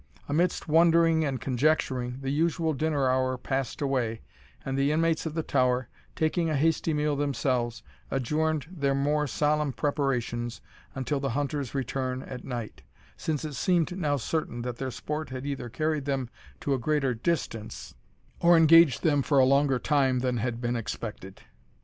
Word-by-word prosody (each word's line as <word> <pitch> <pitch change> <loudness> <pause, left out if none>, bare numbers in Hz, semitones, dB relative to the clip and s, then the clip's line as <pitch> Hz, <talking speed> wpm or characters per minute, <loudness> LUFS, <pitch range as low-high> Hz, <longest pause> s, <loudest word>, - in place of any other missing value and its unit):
Amidst 170 +5 0
wondering 165 0 +4
and 135 -4 -1
conjecturing, 130 -2 0
the 135 0 -2
usual 160 +1 +1
dinner 145 -1 0
hour 130 0 +1
passed 135 -1 -3
long 140 - +1
away; 115 -4 -1 0.4
and 135 - -2
the 140 +2 +2
inmates 165 +1 +1
of 155 - -6
the 160 - -1
tower, 125 -2 +1 0.3
taking 160 +1 +1
a 155 - 0
hasty 160 +2 +1
meal 150 -1 +1
themselves, 130 -4 -1 0.3
adjourned 150 +3 0
their 140 -6 0
more 150 +2 +1
solemn 150 +1 +1
preparations 125 -5 -1 0.4
until 135 +2 -1
the 135 0 -2
hunters' 145 -2 -2
return 130 0 -2
at 125 -2 -8
night, 120 - -6 0.3
since 155 -1 -2
it 150 - -5
seemed 175 +6 +1
now 150 -6 0
certain 125 -2 -3
that 125 -1 -4
their 130 +1 -3
sport 150 +5 -4
had 130 +1 -6
either 140 -4 -4
carried 155 +4 -1
them 135 -4 -2 0.3
to 140 - 0
a 135 - 0
greater 135 0 +1
distance, 115 -4 -3 0.5
or 170 0 +6
engaged 165 -4 +6
them 145 -4 +3
for 140 +1 +1
a 130 - +7
longer 140 0 +3
time 130 -2 +2
than 125 -1 0
had 115 +1 -2
been 120 0 -1
expected. 105 -4 -6
140 Hz, 165 wpm, -27 LUFS, 125-155 Hz, 0.5 s, a